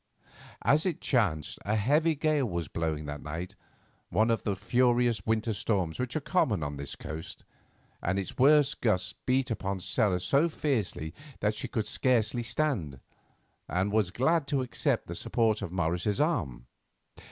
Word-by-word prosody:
As 150 Hz, +3 st, +4 dB
it 175 Hz, -, -2 dB
chanced, 85 Hz, -, 0 dB
a 105 Hz, +2 st, 0 dB
heavy 150 Hz, +9 st, +3 dB
gale 150 Hz, -4 st, +1 dB
was 85 Hz, -3 st, -3 dB
blowing 80 Hz, -2 st, -2 dB
that 75 Hz, 0 st, -6 dB
night, 80 Hz, +4 st, -5 dB, 0.6 s
one 110 Hz, +6 st, +2 dB
of 115 Hz, -, +1 dB
the 100 Hz, -, -1 dB
furious 120 Hz, +1 st, +2 dB
winter 110 Hz, 0 st, +1 dB
storms 95 Hz, -6 st, -1 dB
which 125 Hz, -1 st, -2 dB
are -, -, +2 dB
common 115 Hz, -, +1 dB
on 75 Hz, 0 st, -4 dB
this 70 Hz, 0 st, -5 dB
coast, 80 Hz, +2 st, -8 dB, 0.6 s
and 90 Hz, +2 st, 0 dB
its 95 Hz, -2 st, -4 dB
worst 145 Hz, +2 st, +5 dB
gusts 100 Hz, -6 st, +1 dB
beat 130 Hz, 0 st, +2 dB
upon 100 Hz, -3 st, -2 dB
Stella 90 Hz, 0 st, +1 dB
so 140 Hz, -, +2 dB
fiercely 110 Hz, -, -2 dB, 0.3 s
that 105 Hz, +1 st, +1 dB
she -, -, -4 dB
could 110 Hz, -5 st, -2 dB
scarcely 120 Hz, -2 st, +1 dB
stand, 115 Hz, -, -1 dB, 0.7 s
and 95 Hz, +3 st, 0 dB
was 105 Hz, -3 st, +2 dB
glad 140 Hz, -, +1 dB
to 135 Hz, -2 st, 0 dB
accept 125 Hz, -, 0 dB
the -, -, -6 dB
support 110 Hz, -2 st, +1 dB
of 100 Hz, -4 st, -4 dB
Morris's 90 Hz, +3 st, 0 dB
arm. 85 Hz, -, 0 dB
110 Hz, 160 wpm, -29 LUFS, 90-130 Hz, 0.7 s, worst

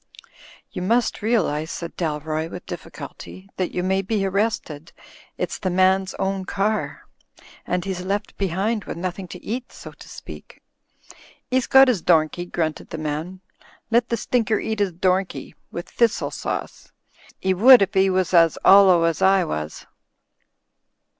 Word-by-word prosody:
"You -, -, -5 dB
must 230 Hz, +6 st, 0 dB
realise," 170 Hz, -9 st, 0 dB
said 170 Hz, -1 st, -6 dB
Dalroy, 155 Hz, -1 st, -3 dB
with 180 Hz, -, -9 dB
difficulty, 165 Hz, +3 st, -9 dB
"that 185 Hz, -, -1 dB
you 180 Hz, -, -2 dB
may 190 Hz, +1 st, +1 dB
be 200 Hz, 0 st, -1 dB
arrested 190 Hz, -6 st, -2 dB, 0.2 s
— -, -, -25 dB
it's -, -, -3 dB
the 185 Hz, -, -2 dB
man's 185 Hz, +1 st, +2 dB
own 190 Hz, 0 st, -2 dB
car; 205 Hz, +3 st, -2 dB, 0.6 s
and 180 Hz, -1 st, -1 dB
he's 190 Hz, -2 st, -3 dB
left 200 Hz, +3 st, -3 dB
behind 200 Hz, +4 st, -1 dB
with -, -, -6 dB
nothing 185 Hz, +1 st, -5 dB
to 180 Hz, +1 st, -11 dB
eat, 245 Hz, +3 st, -4 dB
so -, -, -11 dB
to -, -, -15 dB
speak." -, -, -12 dB, 0.5 s
" -, -, -26 dB
'E's 255 Hz, -1 st, +1 dB
got 265 Hz, 0 st, +7 dB
'is 235 Hz, -9 st, +1 dB
domkey," 170 Hz, +1 st, +1 dB
grunted 160 Hz, -2 st, -3 dB
the -, -, -6 dB
man. 155 Hz, +4 st, -5 dB, 0.5 s
"Let 235 Hz, +1 st, +2 dB
the 235 Hz, -, 0 dB
stinker 225 Hz, -1 st, 0 dB
eat 220 Hz, -1 st, -3 dB
'is 200 Hz, -2 st, +1 dB
domkey, 185 Hz, +2 st, -1 dB, 0.2 s
with 170 Hz, -, -6 dB
thistle 235 Hz, -1 st, 0 dB
sauce. -, -, -5 dB, 0.5 s
'E 190 Hz, -, +3 dB
would 235 Hz, +4 st, +8 dB
if 195 Hz, -, -4 dB
'e 190 Hz, 0 st, +4 dB
was 185 Hz, -1 st, 0 dB
as 165 Hz, -2 st, +5 dB
'ollow 190 Hz, -3 st, +7 dB
as 165 Hz, +1 st, 0 dB
I 190 Hz, 0 st, +4 dB
was." 75 Hz, -, -5 dB
185 Hz, 160 wpm, -22 LUFS, 170-205 Hz, 0.6 s, would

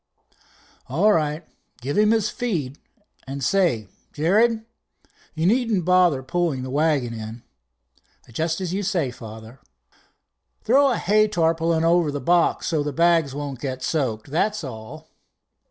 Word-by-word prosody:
"All 185 Hz, +11 st, +3 dB
right, 155 Hz, -1 st, -1 dB, 0.3 s
give 135 Hz, +4 st, -4 dB
him 210 Hz, 0 st, +4 dB
his 220 Hz, -2 st, +1 dB
feed, 155 Hz, -, -3 dB, 0.5 s
and 135 Hz, 0 st, -5 dB
say, 165 Hz, -, +1 dB, 0.3 s
Jared, 220 Hz, +8 st, +2 dB, 0.7 s
you 160 Hz, +1 st, -1 dB
needn't 220 Hz, -3 st, +1 dB
bother 180 Hz, -7 st, +3 dB
pulling 155 Hz, -2 st, -1 dB
the 130 Hz, -, -6 dB
wagon 145 Hz, -5 st, +1 dB
in." 110 Hz, +1 st, -8 dB, 0.9 s
"Just 160 Hz, -, -1 dB
as 180 Hz, -1 st, -3 dB
you 200 Hz, -, -1 dB
say, 180 Hz, -9 st, -1 dB
father." 110 Hz, 0 st, -11 dB, 1.0 s
"Throw 275 Hz, +4 st, +4 dB
a 245 Hz, -, 0 dB
hay 215 Hz, +3 st, +3 dB
tarpaulin 165 Hz, -3 st, +1 dB
over 165 Hz, -2 st, +3 dB
the 145 Hz, -, -3 dB
box, 170 Hz, +5 st, +2 dB
so 160 Hz, -3 st, 0 dB
the 145 Hz, 0 st, -2 dB
bags 165 Hz, -2 st, +2 dB
won't 145 Hz, -3 st, -5 dB
get 130 Hz, -2 st, -5 dB
soaked, 130 Hz, -4 st, -2 dB
that's 210 Hz, +5 st, 0 dB
all." 110 Hz, -5 st, -9 dB
160 Hz, 140 wpm, -23 LUFS, 135-185 Hz, 1.0 s, him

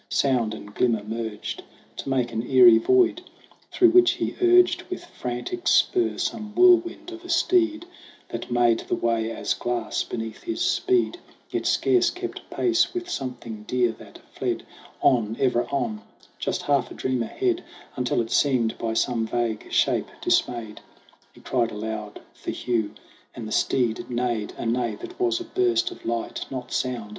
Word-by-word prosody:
Sound 120 Hz, -6 st, +1 dB
and 105 Hz, -1 st, -11 dB
glimmer 115 Hz, -3 st, +1 dB
merged 110 Hz, -1 st, -5 dB, 0.4 s
To -, -, -5 dB
make 125 Hz, -3 st, 0 dB
an 110 Hz, -, -1 dB
eerie 120 Hz, -4 st, +8 dB
void, 365 Hz, -, +3 dB, 0.5 s
through 355 Hz, -3 st, +5 dB
which 360 Hz, 0 st, +6 dB
he -, -, -3 dB
urged 360 Hz, 0 st, +5 dB
With 365 Hz, -1 st, -5 dB
frantic 230 Hz, -, -5 dB
spur 360 Hz, +1 st, +3 dB
some 210 Hz, -1 st, -3 dB
whirlwind 355 Hz, -1 st, +4 dB
of 345 Hz, 0 st, -10 dB
a 355 Hz, -, -11 dB
steed 335 Hz, -1 st, +2 dB, 0.4 s
That -, -, -6 dB
made 120 Hz, -1 st, +3 dB
the -, -, -2 dB
way 115 Hz, -1 st, 0 dB
as 115 Hz, -, -1 dB
glass 120 Hz, -2 st, -2 dB
beneath 110 Hz, -1 st, -5 dB
his 340 Hz, -1 st, -4 dB
speed, 350 Hz, +1 st, +1 dB, 0.3 s
Yet -, -, -1 dB
scarce 370 Hz, -2 st, +3 dB
kept 360 Hz, +1 st, -6 dB
pace 355 Hz, 0 st, +1 dB
with 355 Hz, 0 st, -4 dB
something 120 Hz, -5 st, -5 dB
dear 125 Hz, -2 st, +2 dB
that -, -, -13 dB, 0.2 s
fled -, -, -2 dB, 0.4 s
On, 115 Hz, -4 st, +2 dB
ever 120 Hz, -2 st, +2 dB
on 120 Hz, -6 st, -2 dB, 0.4 s
just -, -, -2 dB
half 140 Hz, -3 st, +1 dB
a -, -, -10 dB
dream 130 Hz, -2 st, -1 dB
ahead: 360 Hz, -, -1 dB, 0.3 s
Until 125 Hz, -1 st, 0 dB
it 115 Hz, -, -5 dB
seemed, 125 Hz, -6 st, +2 dB
by 115 Hz, -1 st, -2 dB
some 115 Hz, -1 st, 0 dB
vague 115 Hz, -2 st, -2 dB
shape -, -, +2 dB
dismayed, 115 Hz, -3 st, 0 dB, 0.5 s
He -, -, -18 dB
cried 120 Hz, -3 st, 0 dB
aloud 105 Hz, -1 st, -6 dB
for -, -, -8 dB
Hugh, 115 Hz, -4 st, -1 dB, 0.4 s
and 115 Hz, -2 st, -6 dB
the -, -, -7 dB
steed 120 Hz, -1 st, 0 dB
neighed 120 Hz, -3 st, -2 dB
A -, -, -5 dB
neigh 120 Hz, +1 st, 0 dB
that 360 Hz, +1 st, -10 dB
was 355 Hz, -1 st, +1 dB
a -, -, -5 dB
burst 360 Hz, 0 st, +1 dB
of 360 Hz, -, -12 dB
light, 115 Hz, 0 st, -3 dB
not 130 Hz, -2 st, -6 dB
sound. 120 Hz, -5 st, -2 dB
125 Hz, 165 wpm, -25 LUFS, -, 0.5 s, eerie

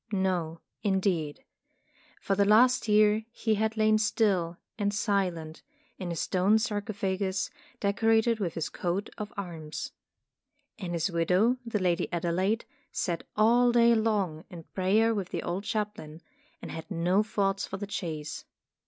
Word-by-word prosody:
No, 180 Hz, -5 st, -1 dB, 0.2 s
indeed. 185 Hz, -7 st, 0 dB, 0.8 s
For 195 Hz, -, -1 dB
the 200 Hz, +1 st, +3 dB
last 235 Hz, +5 st, +5 dB
year 210 Hz, +1 st, +4 dB
he 225 Hz, -1 st, 0 dB
had 220 Hz, +1 st, 0 dB
lain 215 Hz, 0 st, +4 dB
still 195 Hz, -6 st, +1 dB, 0.2 s
and 205 Hz, -1 st, 0 dB
silent 185 Hz, -6 st, -1 dB, 0.4 s
in 180 Hz, -3 st, -4 dB
a -, -, -3 dB
stone 185 Hz, +5 st, +2 dB
sarcophagus 200 Hz, -3 st, -2 dB, 0.3 s
decorated 225 Hz, +3 st, +2 dB
with 175 Hz, -5 st, -2 dB
his 165 Hz, -, -2 dB
coat 180 Hz, +3 st, -2 dB
of 210 Hz, 0 st, -5 dB
arms. 165 Hz, -6 st, -5 dB, 0.9 s
And 180 Hz, -4 st, -4 dB
his 170 Hz, +3 st, 0 dB
widow, 180 Hz, +9 st, +2 dB
the 230 Hz, -3 st, -2 dB
Lady 180 Hz, -2 st, 0 dB
Adelaide, 180 Hz, +6 st, 0 dB, 0.3 s
sat 170 Hz, -3 st, -2 dB
all 240 Hz, +3 st, +5 dB
day 235 Hz, 0 st, +5 dB
long 205 Hz, -8 st, 0 dB
in 170 Hz, -2 st, -9 dB
prayer 210 Hz, +5 st, +3 dB
with 195 Hz, -4 st, -3 dB
the -, -, -3 dB
old 185 Hz, +4 st, -3 dB
chaplain, 210 Hz, -7 st, -4 dB, 0.4 s
and -, -, -6 dB
had 160 Hz, +2 st, -7 dB
no 180 Hz, +2 st, +2 dB
thoughts 195 Hz, -2 st, -1 dB
for 190 Hz, -, -5 dB
the 205 Hz, -, -4 dB
chase. 160 Hz, -6 st, -5 dB
195 Hz, 145 wpm, -29 LUFS, 175-215 Hz, 0.9 s, last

